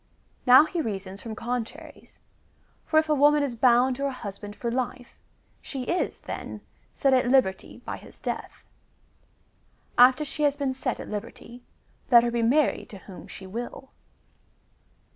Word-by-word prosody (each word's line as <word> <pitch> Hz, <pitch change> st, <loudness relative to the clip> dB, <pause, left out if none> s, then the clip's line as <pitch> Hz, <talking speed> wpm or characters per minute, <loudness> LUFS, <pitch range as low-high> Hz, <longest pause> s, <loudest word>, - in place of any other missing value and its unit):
^ -, -, -41 dB, 0.4 s
Now 255 Hz, +4 st, +9 dB
he 335 Hz, +1 st, -2 dB
reasons 195 Hz, -5 st, -5 dB
from 225 Hz, -2 st, -6 dB
contraries; 250 Hz, +7 st, -6 dB, 0.7 s
for 315 Hz, -, +2 dB
if 315 Hz, 0 st, +4 dB
a 305 Hz, -, +2 dB
woman 295 Hz, +1 st, +4 dB
is 275 Hz, -4 st, -2 dB
bound 245 Hz, +2 st, +3 dB
to 280 Hz, -, -4 dB
her -, -, +1 dB
husband 205 Hz, -5 st, -7 dB
for 235 Hz, +1 st, -3 dB
life, 250 Hz, 0 st, -4 dB, 0.4 s
she 270 Hz, -3 st, -6 dB
is, 350 Hz, +8 st, -2 dB
then, -, -, -7 dB, 0.3 s
set 275 Hz, -1 st, +2 dB
at 255 Hz, -1 st, +3 dB
liberty 250 Hz, -8 st, +1 dB
by -, -, -4 dB
his -, -, -14 dB
death. -, -, -6 dB, 1.4 s
After 255 Hz, +5 st, +6 dB
she 300 Hz, -, -6 dB
has 290 Hz, -1 st, +2 dB
been 275 Hz, -2 st, -1 dB
set 260 Hz, -1 st, -3 dB
at -, -, -7 dB
liberty, 230 Hz, +3 st, -8 dB, 0.5 s
let 235 Hz, -2 st, +8 dB
her 240 Hz, -, 0 dB
he 235 Hz, 0 st, 0 dB
married 270 Hz, +6 st, +2 dB
to 200 Hz, -, -10 dB
whom 190 Hz, -1 st, -12 dB
she 190 Hz, -, -10 dB
will. 240 Hz, +6 st, -7 dB
250 Hz, 160 wpm, -26 LUFS, 230-280 Hz, 1.4 s, Now